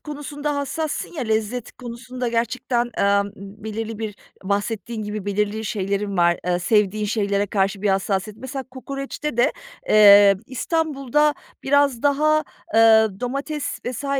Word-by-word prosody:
konusunda 295 0 -4
hassassın 300 +4 -3
ya, 315 - -4
lezzet 220 +1 -2
konusunda 250 0 -6
gerçekten, 240 +1 -1
emm, 200 0 +3
ımm, 200 +2 -12
belirli 220 0 -4
bir 215 -2 -4 0.3
bahsettiğin 215 +3 -2
gibi 210 -1 -5
belirli 210 +2 -1
şeylerin 200 0 -2
var, 175 0 +3
ııı, 175 0 +2
sevdiğin 210 +1 +2
şeylere 205 -1 0
karşı 195 0 -1
bir 205 - +1
hassasiyet. 195 +1 -1
Mesela 265 +1 -5
kokoreçte 275 +1 -5
de, 240 - +3 0.4
eee, 200 -2 +8
İstanbul'da 295 0 0 0.3
biraz 280 -3 +2
daha, 305 +2 +3 0.3
ııı, 220 -3 +5
domates 280 +4 -3
vs. 255 +3 -4
225 Hz, 130 wpm, -22 LUFS, 205-275 Hz, 0.4 s, eee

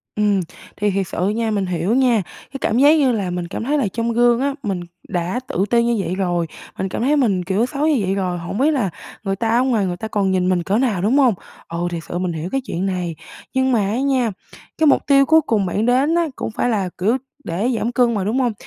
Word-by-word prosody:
Ừm, 210 -2 +2 0.4
thì 205 0 +1
thiệt 195 -1 -1
sự 180 +4 -1
nha, 225 +1 -1
mình 200 -2 0
hiểu 180 +4 0
nha, 250 -5 +3 0.3
cái 275 - -5
cảm 225 - +1
giác 290 +4 +6
như 270 -4 +3
là 200 -5 -1
mình 175 -1 -3
cảm 175 - -5
thấy 290 +5 +1
là 260 -8 +1
trong 230 0 -1
gương 240 0 +4
á, 280 +1 0
mình 190 -5 -2 0.3
đã 175 +6 -1
tự 200 -8 0
ti 235 -1 +3
như 235 0 +1
vậy 180 - -2
rồi, 175 -3 0 0.3
mình 190 - -2
cảm - - -4
thấy 280 +5 +3
mình, 200 -9 +2
kiểu, 195 +5 +1
xấu 290 +4 -1
như 305 - +3
vậy 190 0 0
rồi, 185 -2 -1
hổng 170 +4 -5
biết 290 +6 +3
là 250 -10 0 0.3
người 195 -1 -1
ta 225 +1 -2
ở 250 - +3
ngoài 230 -7 +1
người 175 -1 -3
ta 220 - -5
còn 200 -3 0
nhìn 185 -1 +1
mình 180 -2 +1
cỡ 195 +4 +1
nào, 230 -8 +1
đúng 225 +9 +2
hông? 260 -5 +5 0.3
Ừ, 170 +1 -3
thiệt 170 -1 -4
sự 175 - -5
mình 180 -1 -1
hiểu 160 +3 -4
cái 270 - 0
chuyện 185 -4 -3
này, 180 -3 -2 0.4
nhưng 260 0 +2
mà 235 - +3
á 225 +5 -1
nha, 260 -5 +1 0.5
cái 315 -1 +3
mục - - +3
tiêu 275 -1 +5
cuối 320 +3 +5
cùng 220 -8 0
bạn 210 +4 -1
đến 265 +6 +3
á 340 -1 +2
cũng - - -4
phải 235 - -1
là, 200 -5 0
kiểu, 215 +8 +2 0.3
để 190 +9 -1
giảm 235 - -1
cân 245 -1 +2
mà, 200 -4 -1
đúng 220 +6 0
hông? 245 -3 +1
215 Hz, 265 wpm, -20 LUFS, 185-255 Hz, 0.5 s, giác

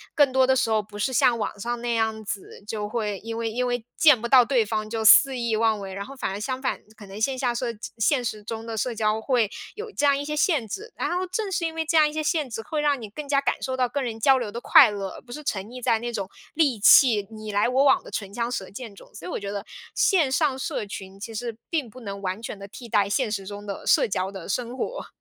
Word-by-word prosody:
更 285 -3 +4
多 260 0 +3
的 265 - +4
时 240 - +1
候 220 -1 +2
不 205 0 -12
是 210 +5 0
像 240 0 +3
网 210 -1 -4
上 240 +2 -3
那 240 -1 -1
样 220 -1 -1
子， 200 0 -7
就 210 -1 -4
会 210 -3 -2
因 225 +1 -6
为 225 -1 -2
因 250 +2 -1
为 245 -2 -2
见 300 -8 +6
不 235 - -2
到 255 -3 +7
对 245 -5 +2
方 215 0 -3
就 225 -1 -2
肆 265 +4 +7
意 235 -2 0
妄 220 -1 +2
为。 190 -1 -7
然 200 +1 -5
后 275 - -10
反 260 - -3
而 200 - -4
相 260 +4 -3
反， - - -1 0.2
可 205 - -12
能 195 +2 -9
线 260 +3 +1
下 250 -2 0
社 240 +1 -2 0.3
现 250 +3 +2
实 215 -2 -3
中 225 +1 -6
的 225 -1 -5
社 235 +2 -1
交 215 0 +1
会 235 -4 +1 0.2
有 435 +1 -7
这 295 - 0
样 280 -1 +4
一 285 - -3
些 300 +1 -4
限 300 - +2
制。 425 - -7
然 - - -2
后 365 +1 -1
正 390 +2 -3
是 340 -2 -1
因 325 0 -3
为 325 - -1
这 325 +1 +2
样 305 -1 +6
一 - - -10
些 310 - -2
限 305 -4 0
制， 225 - -5
会 305 +7 -3
让 290 -4 +1
你 215 - -7
更 290 +7 -8
加 275 -1 +2
感 - - -1
受 260 0 -2
到 250 -2 +1
跟 285 - -2
人 235 -3 -3
交 270 +1 +5
流 235 -4 -3
的 235 - -5
快 295 -4 +7
乐， 200 -2 -4
而 - - -11
不 240 -1 -11
是 300 - -7
沉 195 -7 -2
溺 250 +2 -9
在 225 -1 +2
那 240 0 -5
种 195 -3 -3 0.3
戾 275 -9 +2
气， 215 -5 +6
你 215 -1 -7
来 205 +2 +2
我 260 +3 +3
往 280 - +5
的 - - -9
唇 200 -2 -5
枪 235 +1 -2
舌 195 -6 -4
剑 220 -1 -9
中。 - - -16
所 - - -9
以 - - -5
我 - - -2
觉 200 0 -5
得 200 0 -5 0.3
线 325 -10 +3
上 280 -2 +1
社 240 - -3
群 195 -1 -9
其 225 +2 -7
实 230 0 -5
并 295 -8 -1
不 255 - -13
能 200 -3 -7
完 190 +2 -3
全 220 -2 -6
地 200 - -9
替 240 +3 -10
代 200 -1 +2
现 220 0 0
实 195 -2 -3
中 205 0 -8
的 200 -1 -6
社 - - +4
交 190 -1 -2
的 190 -4 -8
生 245 +4 -2
活， - - -4
235 Hz, 305 characters per minute, -25 LUFS, 210-265 Hz, 0.3 s, 到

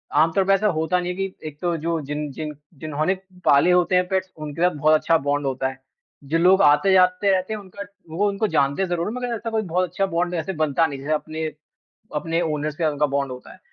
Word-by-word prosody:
आम 165 +1 +4
तौर 195 +3 +2
पे 195 - +4
ऐसा 210 +2 +2
होता 175 0 +1
नहीं 180 0 -2
है - - -5
कि 195 -4 -5
एक 150 -1 -9
तो 175 -1 0
जो 165 +1 -1
जिन 150 +1 -4
जिन 150 +2 -5 0.3
जिन्होंने 155 +4 0 0.3
पाले 145 +6 +5
होते 180 +1 +3
हैं 180 0 +3
पेट्स 190 0 -1
उनके 155 +1 -6
साथ 180 -1 +3
बहुत 155 +2 +3
अच्छा 165 +1 +3
बॉन्ड 145 -1 -1
होता 130 0 -1
है। 130 0 -7 0.4
जो 150 +4 0
लोग 185 +3 +5
आते-जाते 185 +5 +4
रहते 185 +3 0
हैं, 215 - -4
उनका 200 +1 -9 0.3
वो 195 +6 0
उनको 200 +2 -1
जानते 150 +1 +1
ज़रूर 175 -1 -2
हैं, 215 - -3
मगर 245 -1 -3
ऐसा 230 +1 -5
कोई 220 -1 0
बहुत 180 -1 -1
अच्छा 195 +3 0
बॉन्ड 175 +1 0
ऐसे 170 +3 -3
बनता 155 +1 +2
नहीं 140 -2 -6
जैसे 145 +3 -2
अपने 155 +1 -3 0.7
अपने 165 +3 -1
ओनर 150 +1 -2
से 160 +2 -2
उनका 150 0 +1
बॉन्ड 140 -2 -1
होता 125 - -10
है, - - -16
165 Hz, 235 wpm, -23 LUFS, 150-185 Hz, 0.7 s, पाले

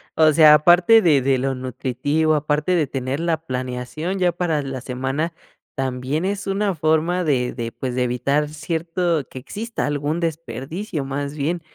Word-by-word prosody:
o 155 -1 +5
sea, 155 0 +7
aparte 175 +8 +6
de 150 -8 +4
de 135 0 +2
lo 135 +1 -1
nutritivo, 130 +5 -1
aparte 150 +4 0
de 155 -5 +2
tener 130 +1 -3
la 170 -1 +1
planeación 130 +8 -4
ya 180 -2 +2
para 170 -4 -1
la 135 -1 -5
semana, 135 +6 -3 0.4
también 135 +4 -2
es 200 0 -2
una 195 0 0
forma 160 +3 +1
de 125 -5 +1
de, 115 -1 -5
pues, 125 -2 -4
de 125 - +1
evitar 140 +5 0
cierto 165 +1 -2
que 130 - -8
exista 220 - -4
algún 145 +3 -1
desperdicio, 160 - -4
más 140 +2 -4
bien. 160 +4 -2
150 Hz, 165 wpm, -21 LUFS, 130-170 Hz, 0.4 s, sea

